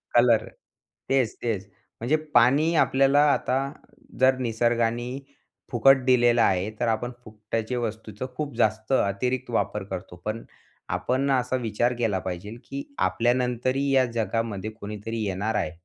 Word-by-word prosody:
Colour. 120 -2 +4 0.6
तेच, 130 -4 +2
तेच. 105 -4 -2 0.3
म्हणजे 125 +7 +2 0.2
पाणी 145 +8 +4
आपल्याला 135 -1 +4
आता 130 - 0 0.6
जर 130 0 +5
निसर्गानी 120 +1 0 0.5
फुकट 130 +2 +5
दिलेला 120 -2 +4
आहे 95 +2 +1
तर 120 - +1
आपण 115 +2 -1
फुकट्याचे 110 +2 -4
वस्तूचं 110 -1 -4
खूप 145 -5 -4
जास्त 110 +2 0
अतिरिक्त 125 +4 0
वापर 105 -3 -1
करतो. 95 -2 -7
पण 110 +2 -3 0.5
आपण 135 +2 0
असा 130 0 +1
विचार 120 +2 0
केला 105 -5 +1
पाहिजेल, 95 +5 -5
की 280 +1 -6 0.2
आपल्यानंतरही 125 +3 0
या 130 -1 +4
जगामध्ये 110 -2 -2
कोणीतरी 110 +1 -6
येणार 100 +3 -2
आहे. 90 - 0
115 Hz, 130 wpm, -25 LUFS, 110-130 Hz, 0.6 s, जर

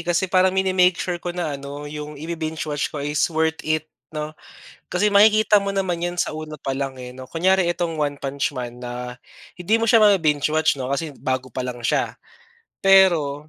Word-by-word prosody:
Kasi 175 +2 +2
parang 185 0 +2
mini-make 185 -1 +3
sure 175 -1 -3
ko 175 0 -5
na 170 -4 -2
ano, 140 +1 -7
'yong 150 0 -7
i-bi-binge-watch 160 -1 -3
ko - - -9
is 150 +1 -1
worth 160 -1 0
it 155 0 -1 0.2
'no. 150 0 -5 0.6
Kasi 205 +4 +1
makikita 210 +1 +5
mo 200 0 -3
naman 185 -3 -1
yan 175 0 -2
sa 175 - -1
una 155 0 -7
pa 135 -2 -4
lang, 135 0 -3
eh 125 -1 -8
'no. 130 0 -10
Kunyari 185 +3 +2
itong 170 -2 -2
One 145 -1 0
Punch 140 0 -3
Man 120 -1 -6
na 125 0 -6 0.4
hindi 180 +5 +2
mo 225 - 0
siya 230 0 +5
mabi-binge-watch 155 -7 +3
'no, 130 - -3
kasi 150 +3 -2
bago 130 -2 -3
pa 130 - -5
lang 125 -1 -5
siya. - - 0 0.7
Pero, 165 -7 +4
155 Hz, 185 wpm, -22 LUFS, 140-180 Hz, 0.7 s, makikita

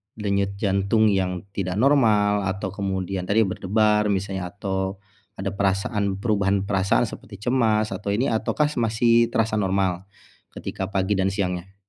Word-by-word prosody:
denyut 100 -2 -1
jantung 100 +2 +2
yang 90 -2 -1
tidak 95 -2 -3
normal, 105 -5 +3
atau 95 0 -3
kemudian 95 -2 -3
tadi 110 +3 +3
berdebar, 105 +2 +1
misalnya. 95 -2 -2
Atau 95 0 -3 0.4
ada 95 0 -3
perasaan 100 +1 0
perubahan 100 -1 0
perasaan, 100 +2 +1
seperti 105 -1 -7 0.2
cemas, 110 -4 +2
atau 105 - -4
ini. 130 +6 0
Ataukah 145 +7 0
mas 115 -1 0
masih 115 0 +4
terasa 110 -2 0
normal, 95 -2 0 0.5
ketika - - -4
pagi 95 +1 0
dan 95 - +2
siangnya? 95 -1 -3
100 Hz, 140 wpm, -23 LUFS, 95-110 Hz, 0.5 s, masih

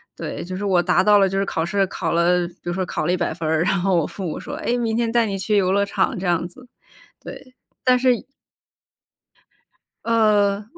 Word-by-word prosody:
对， - - -6
就 185 +1 -6
是 195 - -5
我 185 -3 +2
达 - - +2
到 210 0 +5
了， 195 - +4
就 195 +1 -2
是 195 - 0
考 165 -3 -2
试 195 +1 0
考 165 -3 -3
了 175 +1 +2
比 170 - -16
如 175 - -2
说 185 0 -2
考 - - -3
了 - - +2
100 180 -2 -1
分 160 -1 -4
儿， 160 +1 +2
然 180 - +1
后 190 -1 +1
我 165 - +1
父 195 - -9
母 160 - -4
说： - - -8
“哎， 245 -2 0
明 225 -2 -1
天 235 -1 0
带 235 -1 +3
你 195 -2 -3
去 210 +1 0
游 185 -1 +2
乐 200 +1 +2
场”， 200 +1 -1
这 185 - -3
样 175 0 0
子。 250 +8 -17 0.6
对， 255 -1 -11 0.3
但 250 -1 +4
是 250 -2 +1 1.8
呃， 210 -3 +2
195 Hz, 235 characters per minute, -21 LUFS, 175-220 Hz, 1.8 s, 到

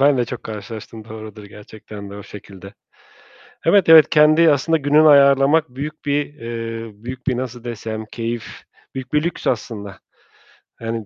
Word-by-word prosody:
Ben 140 0 +4
de 120 - +2
çok 120 +1 -7
karşılaştım, 110 +1 -8
doğrudur 110 -1 -10
gerçekten 105 0 -11
de 100 - -9
o 105 - -9
şekilde. 100 0 -12 0.9
Evet, 185 +2 +4
evet, 160 -2 +8
kendi 155 +2 +5
aslında 155 +3 +1
gününü 150 +2 +4
ayarlamak 140 +2 +5
büyük 150 +4 -7
bir, 145 0 -1
eee, 115 -3 -6
büyük 125 +1 -8
bir 130 - 0
nasıl 125 -1 -6
desem, 110 -2 -5
keyif, 115 +1 -5 0.5
büyük 130 -1 -7
bir 150 0 +2
lüks 170 - -4
aslında. 105 -4 -3 0.8
Yani 115 -1 -4
120 Hz, 150 wpm, -20 LUFS, 110-145 Hz, 0.9 s, evet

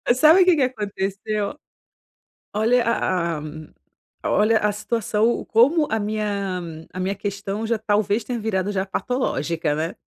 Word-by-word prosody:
Sabe 310 +8 +6
o - - +6
que 360 -2 +5
que 295 - 0
aconteceu? 210 0 -2 1.0
Olha 230 +3 +3
a 175 -7 0
a - - -6 0.8
a - - -1
olha 220 +2 +4
a 210 -1 +1
situação 215 +1 0
o - - -2
como 285 +8 +4
a 220 - 0
minha 205 -3 -2 0.3
a - - -7
minha 190 +2 -1
questão 200 +2 -4
já 230 -1 0
talvez 210 0 +1
tenha 245 -2 -3
virado 205 -2 -1
já 190 -1 0
patológica, 170 - -1
né. 160 +3 -3
210 Hz, 155 wpm, -22 LUFS, 195-230 Hz, 1.0 s, Sabe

